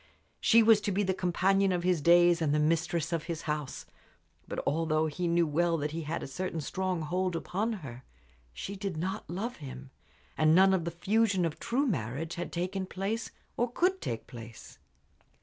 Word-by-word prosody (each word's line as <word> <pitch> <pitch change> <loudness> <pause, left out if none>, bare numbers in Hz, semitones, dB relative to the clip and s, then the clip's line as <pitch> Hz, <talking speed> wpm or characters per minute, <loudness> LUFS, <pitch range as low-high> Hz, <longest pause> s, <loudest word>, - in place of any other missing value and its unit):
She 230 0 +5
was 220 -1 +6
to 205 - -1
be 200 +2 +1
the 190 -1 +1
companion 190 +2 +2
of 175 -1 -1
his 180 -3 +2
days 175 +1 +5
and 150 -2 +2
the - - +2
mistress 165 +1 0
of 165 -1 -1
his 165 -2 -4
house. 150 -3 -3 0.6
But - - -5
although 155 +1 +1
he 170 +3 -2
knew 170 0 +3
well 165 +2 +1
that 150 0 -2
he 165 +2 -4
had 160 +2 -4
a - - -5
certain 165 +4 -4
strong 185 +2 -2
hold 180 +3 -1
upon 205 +7 -1
her, 125 0 -9 0.5
she 195 - -6
did 195 -4 -4
not 185 +4 -3
love 215 +8 -4
him, 135 -2 -9 0.4
and 155 0 +4
none 190 +1 +6
of 175 -3 0
the - - -1
fusion 195 +2 +1
of 160 - -3
true 245 +5 0
marriage 160 - -2
had 175 0 -5
taken 185 +2 -2
place 205 +5 -3 0.3
or 240 0 0
could 370 +7 +1
take 115 - -4
place. 115 -2 -11
175 Hz, 190 wpm, -30 LUFS, 155-190 Hz, 0.6 s, was